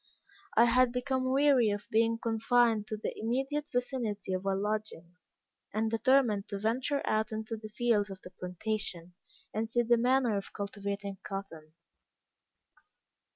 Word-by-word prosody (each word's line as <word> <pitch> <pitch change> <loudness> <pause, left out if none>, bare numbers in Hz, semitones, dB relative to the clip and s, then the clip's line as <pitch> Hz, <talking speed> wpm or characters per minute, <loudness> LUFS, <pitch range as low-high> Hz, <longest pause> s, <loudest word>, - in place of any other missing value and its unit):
I 230 - +8
had 250 +1 +4
become 255 +1 -1
weary 270 -4 +4
of 205 0 -3
being 230 +1 +3
confined 225 -1 +2
to 215 - -3
the 210 - -4
immediate 270 +6 -2
vicinity 240 -7 -2
of 185 +1 -2
our 195 - +2
lodgings, 195 -4 -4 0.4
and 220 0 +1
determined 225 -3 +3
to 200 - -4
venture 250 +7 0
out 215 0 0
into 220 +1 -4
the 215 0 -9
fields 215 -2 +1
of 190 -1 -8
the 180 - -10
plantation, 180 -1 -4 0.4
and 220 +1 -2
see 240 +1 +2
the 240 +1 +4
manner 250 -1 +3
of 195 - -6
cultivating 200 -1 -4
cotton. 195 -7 -7
220 Hz, 145 wpm, -31 LUFS, 200-245 Hz, 0.4 s, I